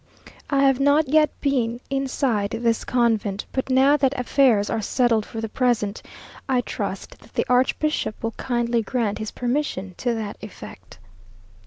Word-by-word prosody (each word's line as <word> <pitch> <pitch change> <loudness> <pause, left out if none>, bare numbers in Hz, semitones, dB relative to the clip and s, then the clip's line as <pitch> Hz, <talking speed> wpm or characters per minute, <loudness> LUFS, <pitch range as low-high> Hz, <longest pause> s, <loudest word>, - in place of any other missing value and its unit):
I 275 -1 +2
have 270 -1 +4
not 285 +2 +3
yet 305 +1 +4
been 245 -4 0
inside 265 -6 0
this 230 -1 +1
convent, 225 -5 0
but 260 0 -2
now 265 +3 +5
that 275 -1 +1
affairs 250 -5 +3
are 225 - -1
settled 230 0 +1
for 225 - -6
the 225 - -2
present, 225 -3 0 0.5
I 255 -2 +3
trust - - -5
that - - -20
the - - +1
archbishop 255 0 +1
will 225 - -1
kindly 235 0 -1
grant 225 -1 -2
his 215 -1 -4
permission 245 -8 -2
to 240 -2 0
that 215 -2 -5
effect. 210 -2 -11
245 Hz, 155 wpm, -23 LUFS, 220-270 Hz, 0.5 s, now